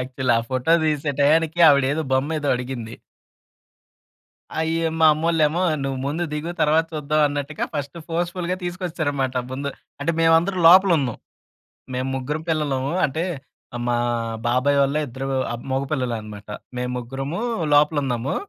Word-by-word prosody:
Actually. 130 0 -1
ఆ - - +1
photo 130 +5 +1
తీసే‌టయానికి 155 +2 +1
ఆవిడ 140 -2 +5
ఏదో 160 - -1
బొమ్మ 145 +4 +1
ఏదో 145 - -2
అడిగింది. 125 -2 -6 1.6
అయ్యో! 165 +1 0
మా 160 - +7
అమ్మోల్లేమో 160 +1 +1 0.2
నువ్వు 135 -1 -2
ముందు 160 +5 -2
దిగు, 150 +3 -3
తర్వాత 160 +2 +3
చూద్దాం 150 0 0
అన్నట్టుగా 145 +1 -3
ఫస్ట్ 145 +2 -4
ఫోర్స్‌ఫుల్‌గా 175 +2 -2
తీసుకొచ్చేసారన్నమాట 155 -7 -2
ముందు. 140 +2 -3 0.3
అంటే 165 +4 0
మేమందరం 165 +3 +3
లోపల 190 +2 +7
ఉన్నాం. 125 -5 -2 0.8
మేము 130 +1 -2
ముగ్గురం 150 +4 -3
పిల్లలము 140 -4 0
అంటే 155 +4 -2 0.5
ఆహ్, 120 - -4
మా 120 - +2 0.5
బాబాయ్ 130 +4 +2
వాళ్ళ 140 +2 +1
ఇద్దరు 130 +3 -6 0.2
ఆహ్, 120 0 -5
మగపిల్లలే 130 -2 -1
అన్నమాట. 105 -1 -11 0.3
మేము 125 0 -2
ముగ్గురము 135 - -4 0.3
లోపల 150 +1 +4
ఉన్నాము. 125 +1 -2
145 Hz, 135 wpm, -22 LUFS, 130-160 Hz, 1.6 s, మా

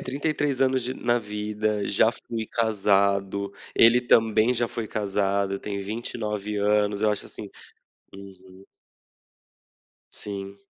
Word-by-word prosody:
33 140 0 -2
anos 130 -1 +2
de 125 +2 -3
na 120 -1 +1
vida, 105 0 -2
já 110 +3 +3
fui 115 -1 -6
casado, 100 -2 +1 0.2
ele 115 +2 +6
também 115 0 +3
já 120 0 +1
foi 115 0 -5
casado, 100 -1 -1
tem 100 -1 -5
29 105 -1 -4
anos, 105 0 +1
acho, 105 -1 0
assim - - -9 0.6
Uhum. 95 -1 -13 1.5
Sim, 100 -1 -6
105 Hz, 110 wpm, -25 LUFS, 100-115 Hz, 1.5 s, ele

